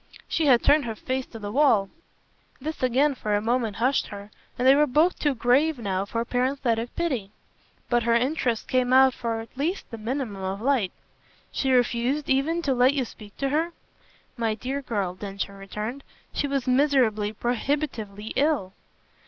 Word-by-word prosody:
"She 320 -2 0
had 245 -3 +5
turned 290 -1 +4
her 225 -2 -4
face 260 +3 -3
to 225 - -10
the 205 -2 -6
wall." 230 -7 +3 0.7
This 310 +4 -5
again 260 +4 +3
for 210 -5 -1
a - - +2
moment 225 -1 0
hushed 255 +4 +1
her, 205 0 -9 0.3
and 250 - +1
they 265 - +9
were 295 +2 +4
both 310 +7 +2
too 290 -3 +1
grave 265 +6 +3
now 195 -4 -2
for 230 +3 -2
parenthetic 245 -2 -1
pity. 265 -13 -1 0.6
But 240 -1 +2
her 235 0 +2
interest 245 -2 0
came 255 0 +1
out 265 0 +7
for 230 -2 -3
at 225 - -13
least 320 +9 -2
the 230 - -7
minimum 225 -3 -3
of 190 +1 -3
light. 240 -5 +1 0.6
"She 265 - 0
refused 250 +3 +1
even 320 +6 +1
to 275 - +1
let 255 +3 +4
you 265 -3 0
speak 210 -3 -13
to 275 - -1
her?" 320 +4 0 0.6
"My 225 -2 0
dear 265 +5 -4
girl," 205 -8 -2
Densher 200 +1 -5
returned, 210 +7 -6 0.3
"she 290 - 0
was 275 -2 -1
miserably, 250 -6 +2
prohibitively 235 -3 -2
ill." 275 -10 +1
250 Hz, 175 wpm, -25 LUFS, 220-275 Hz, 0.7 s, they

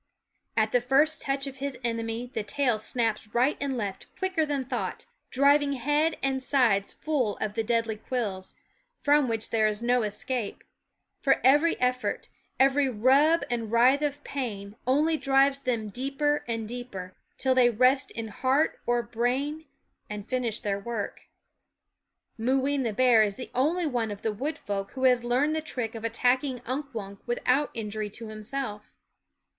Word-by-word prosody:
At 220 -1 +3
the 245 - +3
first 290 +5 +2
touch 275 0 -1
of 275 -1 -7
his 275 -1 -4
enemy 230 +1 -2
the 220 - -1
tail 245 +1 0
snaps 225 -1 -1
right 255 +5 +3
and 275 -2 -1
left 200 -4 -4
quicker 370 -5 0
than 280 -3 -1
thought, - - -4 0.2
driving 280 +1 +4
head 295 +5 +1
and 265 -1 0
sides 235 -8 +2
full 260 -10 -1
of 210 - -3
the 225 +1 -1
deadly 230 -1 0
quills, 210 -5 -4 0.5
from 290 -1 +4
which 225 -2 -3
there 220 -1 +3
is 210 +2 -2
no 245 +1 +3
escape; 220 +2 -3 0.6
for 270 - +3
every 295 +6 +4
effort, 250 0 -1 0.3
every 270 +1 +4
rub 270 +8 +4
and 230 -3 -3
writhe 250 +5 +5
of 290 -1 -2
pain, 210 -7 -5
only 305 +5 +3
drives 275 0 +3
them 230 -5 -1
deeper 275 +6 -1
and 225 -2 -3
deeper, 215 -7 -7 0.2
till 260 -1 +2
they 250 -1 +5
rest 255 +4 +3
in 225 -1 -5
heart 265 +8 +1
or 240 0 +2
brain 255 +7 -1 0.4
and 210 0 -6
finish 245 -3 -1
their 200 -3 -1
work. 215 -1 -5 1.1
Mooween 270 +4 +1
the 235 -3 0
bear 240 +1 +5
is 205 -2 +1
the 250 - -8
only 320 +7 +1
one 240 -6 -1
of 205 -1 -7
the 220 - 0
wood 285 +8 -3
folk 195 -1 -4
who 260 - -5
has 250 -2 +4
learned 260 +6 +1
the 315 - -1
trick 250 -7 -4
of 225 -1 -7
attack 245 +3 +2
ing 260 -3 -3
Unk 275 +4 -3
Wunk 200 -4 -7
without 255 +4 +1
injury 215 -1 -3
to 220 +2 -8
himself. 215 0 -6
250 Hz, 165 wpm, -27 LUFS, 220-275 Hz, 1.1 s, writhe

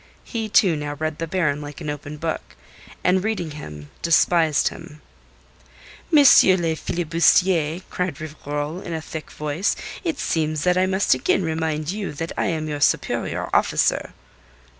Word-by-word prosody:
He, 225 -2 -4
too, 190 -5 +4
now 145 -1 -4
read 155 +1 -3
the 165 - -3
Baron 155 -4 0
like 145 -1 -8
an - - -7
open 145 +1 -7
book, 160 +1 -4 0.5
and 185 +1 +3
reading 200 -7 -2
him 75 - -9
despised 165 -2 +3
him. 150 - -12 1.1
"M. 315 - +5
le 185 - +6
filibustier," 170 0 +2
cried 180 -5 -3
Rivarol 150 +2 -5
in 170 - -5
a - - -2
thick 160 0 -8
voice, 150 +6 -1 0.3
"it 330 -5 -2
seems 155 - -1
that 180 0 +3
I 185 +1 +2
must 190 +1 +2
again 130 +9 +1
remind 160 -1 -2
you 205 -5 -4
that 165 +3 -5
I - - 0
am 160 -2 -2
your 145 -1 -4
superior - - 0
officer." - - +1
160 Hz, 155 wpm, -22 LUFS, 150-180 Hz, 1.1 s, le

